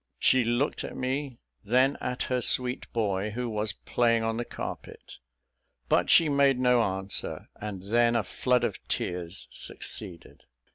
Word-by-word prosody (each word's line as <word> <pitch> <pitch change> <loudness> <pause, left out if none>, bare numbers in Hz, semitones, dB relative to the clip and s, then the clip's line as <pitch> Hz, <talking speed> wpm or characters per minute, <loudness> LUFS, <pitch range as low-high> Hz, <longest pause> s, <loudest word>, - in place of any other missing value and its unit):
She 130 -1 +4
looked 120 +5 0
at - - -7
me, 130 0 -2 0.3
then 130 +6 +3
at 125 0 -2
her 125 -1 -1
sweet 125 +1 +2
boy, 105 -3 0
who 120 +3 -3
was 105 -2 -2
playing 115 -2 +1
on 115 0 -1
the 120 - -2
carpet - - -8 0.7
but - - +3
she 165 - +6
made 140 -2 +3
no 125 -1 +4
answer; 95 -1 -3
and 100 -3 -6
then 120 +3 +3
a 115 - +2
flood 125 +3 +1
of 115 -5 -1
tears 90 +1 -3
succeeded. 85 -3 -5
120 Hz, 150 wpm, -28 LUFS, 105-125 Hz, 0.7 s, she